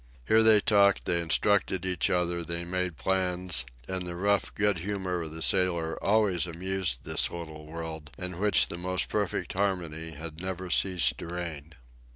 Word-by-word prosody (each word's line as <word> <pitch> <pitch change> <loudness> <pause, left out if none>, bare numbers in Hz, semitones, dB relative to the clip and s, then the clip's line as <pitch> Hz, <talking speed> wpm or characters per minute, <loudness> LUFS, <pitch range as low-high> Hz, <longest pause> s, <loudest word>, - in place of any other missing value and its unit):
There 110 0 +5
they 110 -1 +7
talked, 100 -2 +4
they 85 -1 +1
instructed 95 +2 +1
each 90 -3 +1
other, 85 -1 0
they 85 +1 -3
made 90 -2 -2
plans, 90 +3 0 0.2
and 95 -1 -3
the 85 - -5
rough 100 +2 +1
good 105 -4 +1
humor 95 -1 -3
of 80 - -5
the 80 +1 -4
sailor 85 -3 +1
always 100 -4 +2
amused 90 -5 -3
this - - +2
little 80 -3 -8
world, 80 -2 -7
in 90 -1 -5
which 105 0 +4
the 85 - -6
most 90 +1 0
perfect 105 -4 -2
harmony 85 -5 -2
had 80 +2 -8
never 95 -1 -5
ceased 90 -1 +3
to - - -7
reign. 85 -3 -6
90 Hz, 170 wpm, -28 LUFS, 85-95 Hz, 0.2 s, they